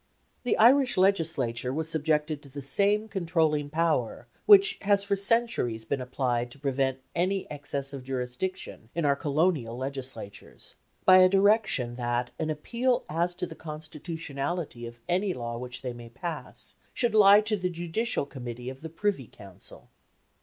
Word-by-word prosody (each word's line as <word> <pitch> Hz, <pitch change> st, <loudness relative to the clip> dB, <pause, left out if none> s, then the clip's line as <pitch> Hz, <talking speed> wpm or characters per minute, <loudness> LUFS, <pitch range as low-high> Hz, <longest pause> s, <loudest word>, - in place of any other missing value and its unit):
The 245 Hz, -, 0 dB
Irish 255 Hz, +2 st, +5 dB
Legislature 155 Hz, -11 st, +1 dB
was 155 Hz, +3 st, -2 dB
subjected 155 Hz, -1 st, 0 dB
to 140 Hz, -, -13 dB
the 140 Hz, +1 st, -8 dB
same 205 Hz, +9 st, +2 dB
controlling 160 Hz, -7 st, 0 dB
power 165 Hz, +2 st, 0 dB, 0.2 s
which 410 Hz, +1 st, +7 dB
has 200 Hz, -1 st, +3 dB
for 200 Hz, 0 st, 0 dB
centuries 195 Hz, -, +1 dB
been 135 Hz, +3 st, -2 dB
applied 125 Hz, -1 st, -1 dB
to 120 Hz, -, -13 dB
prevent 135 Hz, -1 st, -1 dB
any 185 Hz, +2 st, 0 dB
excess 140 Hz, -1 st, -4 dB
of 135 Hz, -2 st, -7 dB
jurisdiction 125 Hz, +1 st, -4 dB
in 170 Hz, -2 st, 0 dB
our 140 Hz, -1 st, +3 dB
Colonial 145 Hz, -5 st, 0 dB
Legislatures, 130 Hz, -6 st, -6 dB, 0.3 s
by 185 Hz, 0 st, +8 dB
a 185 Hz, 0 st, +7 dB
direction 195 Hz, -, +2 dB
that 120 Hz, 0 st, -1 dB
an 160 Hz, -1 st, -1 dB
appeal 240 Hz, -, -1 dB
as 170 Hz, +3 st, 0 dB
to 180 Hz, -, -3 dB
the 170 Hz, -, -9 dB
constitutionality 155 Hz, -3 st, -5 dB
of 120 Hz, 0 st, -12 dB
any 185 Hz, +2 st, 0 dB
laws 115 Hz, 0 st, -5 dB
which 125 Hz, +1 st, -7 dB
they 125 Hz, -2 st, -3 dB
might 120 Hz, 0 st, -12 dB
pass 165 Hz, +1 st, -7 dB, 0.2 s
should 240 Hz, -3 st, +1 dB
lie 205 Hz, -1 st, +7 dB
to 215 Hz, 0 st, 0 dB
the 180 Hz, -3 st, -2 dB
Judicial 175 Hz, +3 st, -1 dB
Committee 125 Hz, -2 st, -7 dB
of 130 Hz, -, -12 dB
the 160 Hz, -, -6 dB
Privy 165 Hz, -, -2 dB
Council. 100 Hz, -3 st, -12 dB
155 Hz, 155 wpm, -28 LUFS, 130-190 Hz, 0.3 s, by